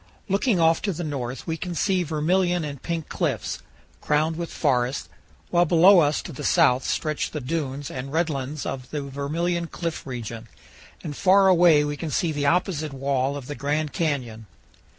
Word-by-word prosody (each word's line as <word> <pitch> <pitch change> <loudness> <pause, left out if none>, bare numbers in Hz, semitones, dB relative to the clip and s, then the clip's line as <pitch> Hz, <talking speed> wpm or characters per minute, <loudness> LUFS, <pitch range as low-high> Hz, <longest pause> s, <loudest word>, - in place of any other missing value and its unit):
Looking 200 +1 +1
off 165 0 +4
to 200 - -1
the 175 +2 -5
north 130 -5 -4
we 165 -1 -2
can 175 +2 -5
see 190 +1 +1
vermilion 175 +2 +1
and 140 -3 -7
pink 165 -2 -3
cliffs, - - -2 0.4
crowned 155 +2 +1
with 170 0 -5
forests, 130 -3 0 0.4
while 175 0 +4
below 180 +3 +7
us 150 -2 +2
to - - -7
the - - -7
south 125 +1 +4
stretch 155 -2 -1
the 155 - -5
dunes 140 -1 -3
and 135 +1 -6
red 165 +2 +1
lands 140 -1 -4
of 130 -2 -5
the 150 -2 -3
Vermilion 165 +5 -2
Cliff 165 -2 -5
region, 115 -2 -6 0.6
and 145 - -5
far 195 +3 +5
away 170 -4 +6
we 145 0 -3
can 165 - -4
see 160 +3 0
the 145 -2 -1
opposite 160 -3 0
wall 135 0 -1
of 140 - -8
the 145 - -5
Grand 145 +3 -2
Canyon. 125 -9 -2
150 Hz, 180 wpm, -24 LUFS, 140-170 Hz, 0.6 s, below